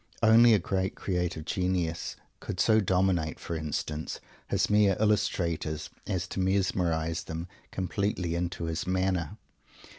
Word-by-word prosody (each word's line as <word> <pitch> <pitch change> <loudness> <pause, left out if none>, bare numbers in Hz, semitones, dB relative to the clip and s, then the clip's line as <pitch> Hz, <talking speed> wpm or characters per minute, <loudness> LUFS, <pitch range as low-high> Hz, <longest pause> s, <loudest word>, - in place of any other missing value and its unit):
Only 115 +1 +7
a - - +5
great 95 +1 -1
creative 90 -4 -2
genius 90 -3 -1 0.2
could 90 - -5
so 110 -1 +5
dominate, 90 -5 +1
for 85 - -4
instance, 75 0 -3 0.3
his - - +1
mere 105 -2 +4
"illustrators," 85 -7 0 0.2
as 90 -1 -1
to - - -4
mesmerize 90 -4 0
them 80 +2 -5 0.2
completely 95 -2 -1
into 85 0 -2
his 80 +2 -3
manner. 95 -3 0
90 Hz, 125 wpm, -29 LUFS, 85-95 Hz, 0.3 s, Only